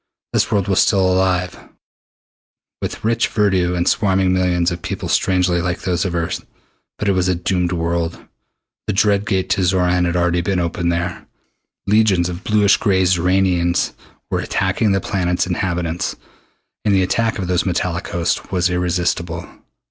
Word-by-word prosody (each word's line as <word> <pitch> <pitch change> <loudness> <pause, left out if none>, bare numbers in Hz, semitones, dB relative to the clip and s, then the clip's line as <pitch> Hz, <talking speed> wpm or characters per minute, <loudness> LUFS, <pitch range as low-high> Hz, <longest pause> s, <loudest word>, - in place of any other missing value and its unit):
This - - +1
world 100 -2 +1
was 95 -2 +2
still 95 -2 +3
alive, 90 -1 0 1.2
with - - -5
rich 115 +1 +2
verdure 95 -4 +1
and 85 - 0
swarming 95 -3 +2
millions 90 -1 +1
of 85 0 -5
people - - -4
strangely 90 -2 +1
like 90 +1 -2
those 90 -2 -1
of 90 -2 -2
Earth. 85 -1 -2 0.5
But 105 - -3
it - - +4
was 95 -1 +1
a 90 - +2
doomed 90 0 -1
world. 85 -1 -1 0.7
The - - 0
dread 100 0 +2
Gate 95 -2 0
to 95 - +2
Xoran 90 -1 +2
had 85 0 -1
already 90 0 +1
been 95 +2 -1
opened 85 0 -1
here. 85 +1 -3 0.6
Legions 100 -4 +3
of 90 +1 -7
bluish 105 -2 +3
gray 95 -4 +2
Xoranians 90 -1 +1 0.4
were - - 0
attacking 95 +3 0
the 95 -1 +1
planet's 90 -2 0
inhabitants, 90 -2 -2 0.7
and 100 -2 +2
the 95 - +3
attack 115 +5 0
of 95 - -3
those 90 +1 0
metallic 90 -1 -1
hosts 85 -1 -2
was 90 -1 +1
irresistible. 85 -1 -1
90 Hz, 160 wpm, -19 LUFS, 85-95 Hz, 1.2 s, it